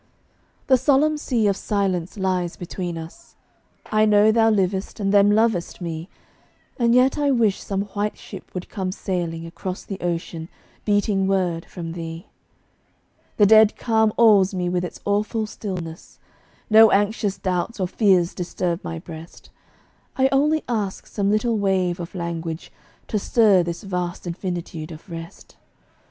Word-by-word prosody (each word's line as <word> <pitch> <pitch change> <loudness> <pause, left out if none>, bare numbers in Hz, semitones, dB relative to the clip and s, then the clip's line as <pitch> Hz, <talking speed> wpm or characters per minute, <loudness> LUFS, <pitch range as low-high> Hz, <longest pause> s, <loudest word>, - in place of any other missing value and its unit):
The 260 - +5
solemn 285 +4 +3
Sea 245 -7 0
of 200 -1 +3
Silence 190 -3 -2
lies 185 -3 -1
between 175 -1 -5
us; 160 0 -11 0.6
I 215 0 +4
know 210 0 +5
thou 225 0 +4
livest, 195 -1 0
and 200 -1 0
them 200 0 +6
lovest 210 -4 +1
me, 165 0 -5 0.7
And 235 0 +3
yet 255 +3 +4
I 290 -1 +2
wish 230 -7 +2
some 195 0 -2
white 205 +1 -2
ship - - -11
would 180 - -5
come 190 -3 -3
sailing 175 -4 -3
Across 180 +2 -6
the 195 - -7
ocean, 170 -1 -4 0.4
beating 205 -2 +1
word 180 -4 0
from 170 -3 -7
thee. 165 0 -7 1.1
The 210 - +6
dead 220 +1 +6
calm 220 -2 +2
awes 205 -4 +5
me 180 -1 -1
with 180 0 -1
its 180 - -6
awful 210 +2 0
stillness. 180 -6 -7 0.5
No 220 0 +7
anxious 205 0 +1
doubts 185 +4 -2
or 185 - 0
fears 185 -3 +2
disturb 175 0 -3
my 165 - -5
breast; 165 0 -11 0.7
I 265 0 +4
only 300 +3 +2
ask 210 -5 -2
some 200 -2 -1
little 215 +1 +1
wave 185 -3 +1
of 170 +2 -7
language, 170 -2 -5 0.4
To 210 - 0
stir 205 -3 +4
this 170 +3 -4
vast 180 -3 -4
infinitude 175 -2 -5
of 155 +3 -11
rest. 165 0 -10
195 Hz, 150 wpm, -22 LUFS, 175-215 Hz, 1.1 s, No